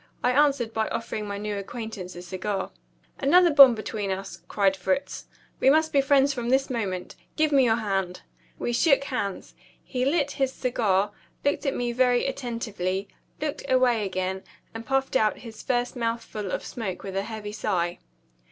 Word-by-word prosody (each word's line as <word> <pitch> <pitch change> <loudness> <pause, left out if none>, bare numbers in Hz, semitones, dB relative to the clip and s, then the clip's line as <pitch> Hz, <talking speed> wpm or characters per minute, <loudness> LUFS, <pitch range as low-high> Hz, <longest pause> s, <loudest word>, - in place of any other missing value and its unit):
I 250 - +3
answered 275 -4 +2
by 220 -1 0
offering 220 -2 -4
my 200 0 -4
new 205 0 -3
acquaintance 200 -3 -7
a 175 - -8
cigar. 190 +2 -3 0.5
"Another 340 +4 +5
bond 275 -4 +9
between 215 -2 -4
us," 190 -3 -5
cried 195 -2 +2
Fritz. 275 +10 -2 0.3
"We 265 - +5
must 315 +2 +3
be 280 - +5
friends 275 0 +3
from 240 -2 -3
this 270 +1 +2
moment. 195 -7 -3 0.2
Give 310 -1 +2
me 275 -3 +5
your 225 -2 +4
hand." 195 -5 -2 0.3
We 240 - -2
shook 275 +2 +4
hands. 225 -8 -4 0.3
He 250 -2 -2
lit 285 +1 +1
his 270 -1 0
cigar, 210 -7 +1 0.3
looked 285 0 +1
at 275 - 0
me 240 -1 -1
very 245 0 +2
attentively, 215 -8 -3 0.3
looked 300 -1 -3
away 250 -4 +3
again, 190 0 -2 0.3
and 225 0 -8
puffed 270 0 0
out 215 -4 +3
his 225 -3 -10
first 245 0 -1
mouthful 230 -4 -3
of - - -3
smoke 200 -6 -5
with 195 -1 -6
a 195 - +1
heavy 215 0 -6
sigh. 180 -5 -1
230 Hz, 170 wpm, -26 LUFS, 200-270 Hz, 0.5 s, bond